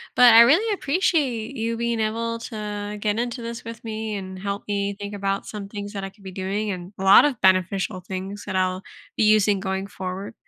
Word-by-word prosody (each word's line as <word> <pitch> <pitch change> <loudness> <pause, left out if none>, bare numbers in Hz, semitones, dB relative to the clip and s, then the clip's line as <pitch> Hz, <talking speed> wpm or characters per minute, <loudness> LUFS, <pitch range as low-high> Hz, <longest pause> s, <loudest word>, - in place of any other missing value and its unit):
But 245 -2 +8
I 230 - +11
really 340 - +5
appreciate 280 - 0
you 230 0 -2
being 235 -1 -1
able 230 +1 -1
to 210 -2 -5
get 210 0 0
into 240 +1 -2
this 230 0 -6
with 230 0 -8
me 220 -1 -4
and 190 -1 -6
help 200 +1 -4
me 200 -1 -1
think 205 0 -6
about 195 0 -2
some 205 -2 -6
things 205 0 -7
that 195 -1 -4
I 195 - -4
could 200 -1 -22
be 190 - -7
doing 195 +3 -2
and 185 +1 -6
a - - -3
lot 195 +8 +8
of 270 -6 -1
beneficial 185 +1 +2
things 190 +2 -6
that 190 -2 -4
I'll 185 0 0 0.3
be - - +3
using 210 -2 +4
going 190 0 -3
forward. 190 +2 -6
205 Hz, 210 wpm, -23 LUFS, 195-230 Hz, 0.3 s, I